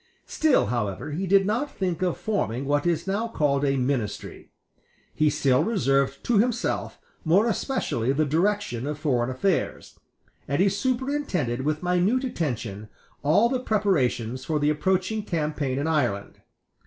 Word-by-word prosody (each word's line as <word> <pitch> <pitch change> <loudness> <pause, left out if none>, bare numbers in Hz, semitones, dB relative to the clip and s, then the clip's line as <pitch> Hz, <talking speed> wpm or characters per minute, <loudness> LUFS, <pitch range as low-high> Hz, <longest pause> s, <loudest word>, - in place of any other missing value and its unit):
Still, 315 -3 +2
however, 120 +3 -3
he 185 +6 -3
did 195 +1 +4
not 230 +8 0
think 185 -2 -2
of 180 -2 0
forming 140 - -2
what 145 +3 +1
is 170 -1 0
now 200 +4 -1
called 145 -10 0
a 135 -1 +2
ministry. 125 -5 -3 0.6
He 155 0 +2
still 140 -2 +2
reserved 140 - +1
to 230 -4 +2
himself 240 +1 -1 0.2
more 180 +7 +4
especially 205 - -1
the 155 +3 +1
direction 165 - 0
of 150 0 -3
foreign 130 -6 0
affairs; 165 +9 -2 0.5
and 140 +3 -1
he 195 +2 +4
superintended 240 - -1
with 155 +4 -1
minute 180 +8 +2
attention 115 - -3 0.3
all 170 +11 +4
the 255 +1 -1
preparations 130 - 0
for 155 +2 -1
the 150 0 +2
approaching 190 +7 0
campaign 150 -8 -2
in 140 - -1
Ireland. 125 -11 -1
155 Hz, 145 wpm, -25 LUFS, 135-200 Hz, 0.6 s, did